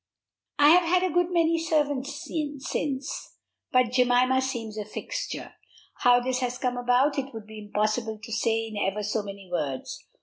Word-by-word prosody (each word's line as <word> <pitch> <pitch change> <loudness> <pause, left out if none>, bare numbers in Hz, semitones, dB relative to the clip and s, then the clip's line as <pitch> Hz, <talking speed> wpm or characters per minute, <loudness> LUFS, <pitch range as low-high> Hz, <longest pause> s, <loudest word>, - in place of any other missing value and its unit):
I 290 0 +7
have 355 +2 +7
had 365 +1 +3
a 370 -4 0
good 350 0 +2
many 335 -1 +3
servants 290 -4 -1 0.4
since, 275 -1 -3 0.4
but 255 -2 +3
Jemima 250 +1 +3
seems 235 -5 -4
a 215 - -3
fixture. 215 - -5 0.4
How 245 0 +5
this 255 +1 -1
has 250 -1 -2
come 250 -1 -1
about, 250 +4 +2
it 270 0 -4
would 220 -2 -7
be 215 0 -10
impossible 215 +2 0
to 230 - -8
say 225 0 +1
in 220 -2 -7
ever 205 +1 -1
so 210 +1 0
many 200 -1 -9
words. 140 -6 -3
250 Hz, 170 wpm, -27 LUFS, 220-280 Hz, 0.4 s, I